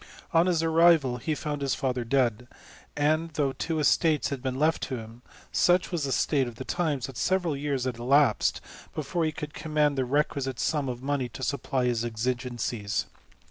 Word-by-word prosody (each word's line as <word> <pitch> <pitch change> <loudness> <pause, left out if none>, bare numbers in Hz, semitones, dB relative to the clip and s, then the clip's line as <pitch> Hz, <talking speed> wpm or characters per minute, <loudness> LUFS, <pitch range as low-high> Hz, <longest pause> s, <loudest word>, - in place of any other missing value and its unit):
On 165 +2 +5
his 170 -3 +2
arrival, 165 -6 +4
he 155 +5 -2
found 150 -1 -4
his 140 -1 0
father 125 -2 -1
dead; 120 -1 +1 0.5
and, 155 +3 +2
though 140 -3 +1
two 160 +4 -3
estates 155 +1 +2
had 140 -3 -4
been 130 0 -2
left 155 +3 +2
to 130 - -3
him, 115 +1 -10 0.3
such 180 +1 +3
was 165 -5 -1
the 135 - -2
state 135 -1 +1
of 120 - -8
the 130 - -7
times, 150 -8 -1
that 135 -3 -8
several 180 -2 +1
years 140 -2 -2
elapsed 130 0 +2 0.3
before 160 +3 -1
he 155 - 0
could 150 -1 -7
command 150 -2 0
the 130 - +1
requisite 135 -1 -1
sum 145 -4 0
of 125 0 -6
money 135 -3 -1
to 130 - -8
supply 135 -1 -1
his 120 -2 0
exigencies. 120 -2 -2
140 Hz, 180 wpm, -27 LUFS, 125-155 Hz, 0.5 s, On